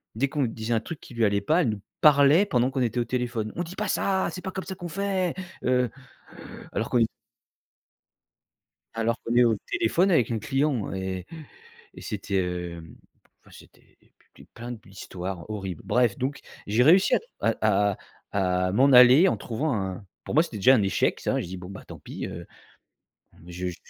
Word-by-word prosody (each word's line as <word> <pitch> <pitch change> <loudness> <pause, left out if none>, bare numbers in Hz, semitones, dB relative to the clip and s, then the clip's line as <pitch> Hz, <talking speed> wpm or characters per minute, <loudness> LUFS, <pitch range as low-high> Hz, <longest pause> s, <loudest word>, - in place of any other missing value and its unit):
Dès 140 +5 +1
qu'on 145 -1 -1
disait 115 0 -2
un 115 - +2
truc 165 +2 -7
qui - - -14
lui 115 -1 +2
allait 100 0 +1
pas, 160 - +2
elle 120 - +1
nous 105 -2 -4 0.2
parlait 150 +5 +6
pendant 125 -7 +1
qu'on 130 - -2
était 120 0 0
au 120 - 0
téléphone: 120 -4 -2
«On 175 - -2
dit 180 +3 -9
pas 210 - -2
ça! 190 -1 0
C'est 180 - -7
pas 190 - -4
comme 190 - -5
ça 190 - -6
qu'on 175 - -7
fait!» 190 -1 -1 0.3
Heu, 125 -1 +2 0.8
alors 110 +3 -2
qu'on 125 - +2
est 115 - +5 1.9
alors 115 0 0
qu'on 115 +1 -2
est 125 - +6
au 115 -2 +3 0.2
téléphone 200 - +2
avec 125 -8 +3
un 110 - -1
client 135 -4 -1
et 95 -1 -4 0.7
et - - -9
c'était, 100 -1 -2
heu, 90 -2 -4 0.6
enfin, - - -21
c'était - - -19 0.4
p - - -16
plein 120 +1 -7
d'histoires 95 -3 -8
horribles. 95 -5 -5
Bref, 120 -4 +2
donc 135 +2 -3 0.3
j'ai 110 +4 +2
réussi 180 +6 +5
à - - +2 0.4
à 105 -1 +3 0.4
à 90 -2 +1
à - - -1
m'en 135 +7 +4
aller 125 +8 +8
en - - -1
trouvant 135 +5 -2
un 95 0 -4 0.2
pour - - -5
moi, 155 - +7
c'était 115 -10 -7
déjà 130 +7 +6
un 110 - +2
échec 95 - 0
ça. - - 0
Je - - -6
dis: 95 +1 -7
«Bon 90 +1 -9
beh 95 - -9
tant - - -10
pis, - - -7
heu, 85 +1 -8 1.0
je 90 +1 -5
j» 85 - -6
120 Hz, 195 wpm, -26 LUFS, 100-140 Hz, 1.9 s, aller